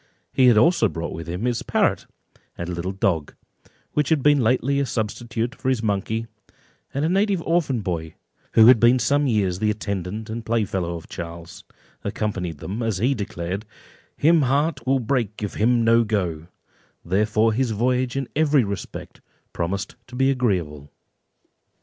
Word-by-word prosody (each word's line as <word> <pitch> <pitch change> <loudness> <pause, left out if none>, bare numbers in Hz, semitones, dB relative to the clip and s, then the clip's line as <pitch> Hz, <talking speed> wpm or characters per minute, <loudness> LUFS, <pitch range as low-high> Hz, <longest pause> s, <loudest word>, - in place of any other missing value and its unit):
He 130 - +5
had 120 -3 +6
also 160 -1 +4
brought 85 0 -5
with 85 - -7
him 90 +7 -3
his 120 -2 0
parrot, - - 0 0.5
and 85 - -4
a - - -4
little 90 +2 -3
dog, 90 -5 -1 0.6
which 150 -3 0
had 155 -5 +2
been 145 -1 +5
lately 130 +4 +2
a 140 - +1
substitute 115 +2 -3
for 130 - -3
his 125 -4 0
monkey; 110 +2 -1 0.7
and 140 +3 -1
a - - +1
native 195 +1 +2
orphan 155 -8 +1
boy, 80 -4 -4 0.4
who 110 - +7
had 120 0 +8
been 120 +3 +5
some 140 +4 +2
years 100 -6 +1
the 105 - +1
attendant 105 0 -3
and 115 +1 -5
playfellow 95 -7 -1
of 85 - -9
Charles, 85 0 -8 0.4
accompanied 95 -7 -3
them, 100 +10 -5
as 110 -4 -1
he 125 +8 +2
declared 95 -3 -4 0.5
"him 165 +2 +4
heart 140 +3 0
will 135 +1 +4
break 115 -4 -1
if 105 - -3
him 120 +2 +2
no 115 +1 +5
go;" 90 -7 -2 0.6
therefore 105 +4 +2
his 125 +2 0
voyage 125 +3 0
in 135 -2 -2
every 150 -3 +3
respect 100 -1 -6 0.3
promised 95 +3 -3
to 125 - -11
be 135 +1 +3
agreeable. 90 - -1
110 Hz, 165 wpm, -23 LUFS, 95-130 Hz, 0.7 s, had